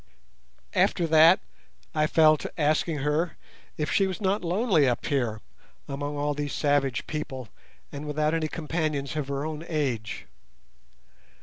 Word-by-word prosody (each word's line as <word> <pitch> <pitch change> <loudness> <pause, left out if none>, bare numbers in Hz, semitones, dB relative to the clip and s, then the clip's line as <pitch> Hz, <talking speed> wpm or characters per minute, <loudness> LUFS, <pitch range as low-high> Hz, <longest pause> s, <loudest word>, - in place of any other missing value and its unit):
After 175 - +2
that 160 +3 +6 0.5
I 155 -1 +2
fell 155 0 +5
to - - -6
asking 155 +1 +1
her 155 +4 0 0.4
if 150 0 -1
she 195 - +3
was 185 - -4
not 200 -1 0
lonely 175 - +3
up 120 - -2
here 120 -6 -1 0.5
among 145 +1 -4
all 145 0 0
these 145 0 -3
savage 140 -4 +1
people 130 -6 -5 0.4
and 145 +1 -6
without 150 +1 0
any 160 -1 0
companions 155 -3 -2
of 150 -3 -2
her 140 +1 -2
own 155 0 -5
age. 130 -9 -2
150 Hz, 140 wpm, -27 LUFS, 140-160 Hz, 0.5 s, that